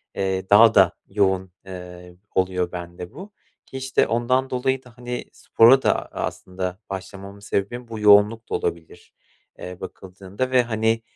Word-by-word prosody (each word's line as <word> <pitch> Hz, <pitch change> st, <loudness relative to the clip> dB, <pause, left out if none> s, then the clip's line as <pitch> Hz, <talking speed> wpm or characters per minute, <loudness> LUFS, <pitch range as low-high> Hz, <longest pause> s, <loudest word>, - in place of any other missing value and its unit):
Eee, 95 Hz, -1 st, -2 dB
daha 110 Hz, +2 st, +7 dB
da 95 Hz, -4 st, +6 dB, 0.2 s
yoğun, 95 Hz, -2 st, 0 dB
eee, 90 Hz, -1 st, -10 dB, 0.2 s
oluyor 90 Hz, -1 st, 0 dB
bende 90 Hz, 0 st, -8 dB
bu. 200 Hz, +5 st, -11 dB, 0.3 s
Ki, 135 Hz, -, -9 dB
işte, 130 Hz, 0 st, +1 dB
ondan 130 Hz, +3 st, 0 dB
dolayı 130 Hz, +1 st, -1 dB
da, 125 Hz, -1 st, -18 dB
hani, 125 Hz, 0 st, -5 dB
spora 125 Hz, +4 st, +5 dB
da, -, -, +2 dB
aaa, -, -, -4 dB
aslında 90 Hz, 0 st, -5 dB
başlamamın 95 Hz, +1 st, -8 dB
sebebim 105 Hz, +4 st, -3 dB
bu 115 Hz, -1 st, -7 dB
yoğunluk 105 Hz, +2 st, +4 dB
da -, -, -1 dB
olabilir, 85 Hz, -1 st, -5 dB, 0.5 s
eee, 90 Hz, 0 st, -8 dB
bakıldığında. 95 Hz, +6 st, -6 dB
Ve, 125 Hz, -1 st, +4 dB
hani, 110 Hz, 0 st, 0 dB
100 Hz, 150 wpm, -23 LUFS, 95-120 Hz, 0.5 s, daha